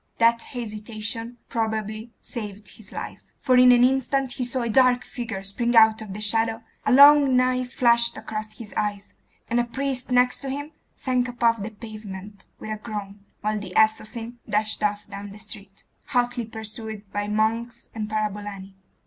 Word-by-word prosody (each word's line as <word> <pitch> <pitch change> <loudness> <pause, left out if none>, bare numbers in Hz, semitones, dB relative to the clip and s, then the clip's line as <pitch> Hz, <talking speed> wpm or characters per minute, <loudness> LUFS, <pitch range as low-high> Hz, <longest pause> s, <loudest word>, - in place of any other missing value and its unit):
That 230 0 +4
hesitation 225 0 -5
probably 220 0 -2
saved 210 -4 -6
his 210 -3 -15
life; - - -6 0.2
for 255 -3 +2
in 250 0 +8
an 245 0 +6
instant 265 0 +2
he 265 - -3
saw 245 0 -1
a - - -1
dark 250 +2 +4
figure 225 -6 -5
spring 235 +5 -1
out 220 -1 +7
of 200 -3 -7
the 210 - -6
shadow, 225 +1 +1 0.2
a - - +4
long 280 0 +8
knife 255 0 +1
flashed 235 -1 +3
across 215 0 -5
his 220 -3 -10
eyes, 205 -1 -2 0.3
and 235 - +1
a - - +3
priest 260 +1 -3
next 250 0 +3
to 275 - -5
him 285 +3 -4 0.2
sank 255 -1 0
upon 235 -2 +1
the 205 - -3
pavement 210 -3 -9
with 215 - -7
a 215 - -2
groan, 205 -3 -6 0.2
while 215 0 0
the 190 -3 -8
assassin 225 +2 +1
dashed 215 +1 0
off 210 0 -1
down 200 0 -7
the - - -11
street, 200 -2 -10 0.2
hotly 245 -2 0
pursued 220 -1 -7
by 205 0 -1
monks 225 +3 -1
and 215 -1 -4
parabolani. 205 -2 -3
225 Hz, 170 wpm, -25 LUFS, 210-245 Hz, 0.3 s, in